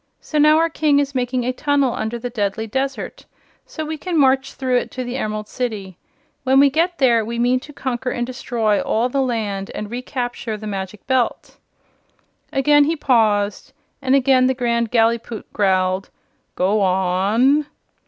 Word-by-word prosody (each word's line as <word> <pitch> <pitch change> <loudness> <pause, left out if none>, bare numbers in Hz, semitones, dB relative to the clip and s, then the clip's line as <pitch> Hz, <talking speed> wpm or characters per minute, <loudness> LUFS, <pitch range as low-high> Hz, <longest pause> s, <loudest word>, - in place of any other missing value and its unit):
So 305 - -2
now 305 +1 +6
our 330 +1 +3
King 305 -3 +1
is 285 -1 0
making 250 -1 -1
a 255 - 0
tunnel 280 -2 +1
under 220 +2 -3
the 245 +1 -6
deadly 210 -1 -2
desert, 265 +5 -4 0.4
so 315 - -5
we 310 0 -5
can 355 0 -2
march 265 -1 +2
through 255 -2 0
it - - -2
to 255 - -5
the 245 0 -5
Emerald 215 -4 -3
City. 210 -7 -4 0.5
When 265 +1 +4
we 280 0 +5
get 340 +4 +1
there 235 -4 +3
we 235 +2 -5
mean 245 +2 +2
to 295 - -12
conquer 255 -2 -3
and 240 -1 -2
destroy 235 -4 -1
all 235 +3 0
the 275 +2 0
land 215 -6 -2
and 210 0 -5
recapture 245 -2 -4
the 215 - -9
Magic 195 -1 -6
Belt." 255 -2 -1 0.9
Again 290 +2 +4
he 325 +3 0
paused, 215 -8 +1 0.3
and 265 0 +2
again 260 -1 +4
the 260 - +1
Grand 235 -2 0
Gallipoot 230 -1 0
growled: 190 -1 +1 0.5
"Go 200 +3 +1
on!" 195 +10 +2
245 Hz, 170 wpm, -20 LUFS, 215-270 Hz, 0.9 s, now